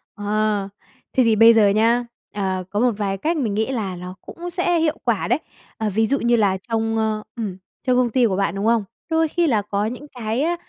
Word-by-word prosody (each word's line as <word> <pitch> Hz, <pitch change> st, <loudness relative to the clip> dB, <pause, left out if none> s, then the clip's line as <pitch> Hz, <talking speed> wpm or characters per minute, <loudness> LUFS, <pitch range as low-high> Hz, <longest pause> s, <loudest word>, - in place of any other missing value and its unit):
Ờ. 205 Hz, -1 st, 0 dB, 0.4 s
Thế 260 Hz, -, +4 dB
thì 225 Hz, -2 st, +3 dB
bây 225 Hz, +2 st, +8 dB
giờ 220 Hz, -2 st, +5 dB
nhé, 225 Hz, +4 st, +3 dB, 0.3 s
ờ, 190 Hz, -2 st, -2 dB
có 205 Hz, -, -2 dB
một 245 Hz, +1 st, +3 dB
vài 195 Hz, -2 st, -1 dB
cách 320 Hz, -, -1 dB
mình 230 Hz, -8 st, -1 dB
nghĩ 220 Hz, +5 st, 0 dB
là 205 Hz, -7 st, -3 dB
ló 180 Hz, +1 st, -7 dB
cũng 350 Hz, +1 st, -8 dB
sẽ 350 Hz, -1 st, +1 dB
hiệu 320 Hz, -1 st, +1 dB
quả 235 Hz, -5 st, 0 dB
đấy. 245 Hz, +5 st, +2 dB, 0.4 s
Ờ, 220 Hz, -1 st, -1 dB
ví 220 Hz, +3 st, +1 dB
dụ 275 Hz, +4 st, +1 dB
như 235 Hz, 0 st, +3 dB
là 200 Hz, -4 st, +2 dB
trong, 225 Hz, 0 st, 0 dB
ơ 215 Hz, -1 st, 0 dB
ừm, 210 Hz, -6 st, -4 dB, 0.3 s
trong 250 Hz, -, +3 dB
công 250 Hz, -1 st, +3 dB
ty 245 Hz, +2 st, +3 dB
của 200 Hz, -5 st, +1 dB
bạn, 195 Hz, -2 st, 0 dB
đúng 200 Hz, -, -2 dB
không? 230 Hz, -1 st, +3 dB, 0.3 s
Đôi 320 Hz, 0 st, +2 dB
khi 340 Hz, +2 st, +1 dB
là 220 Hz, -7 st, +2 dB
có 200 Hz, 0 st, -2 dB
những 250 Hz, +6 st, -5 dB
cái, 235 Hz, -2 st, -3 dB
a, 340 Hz, +3 st, +1 dB
225 Hz, 235 wpm, -21 LUFS, 205-250 Hz, 0.4 s, bây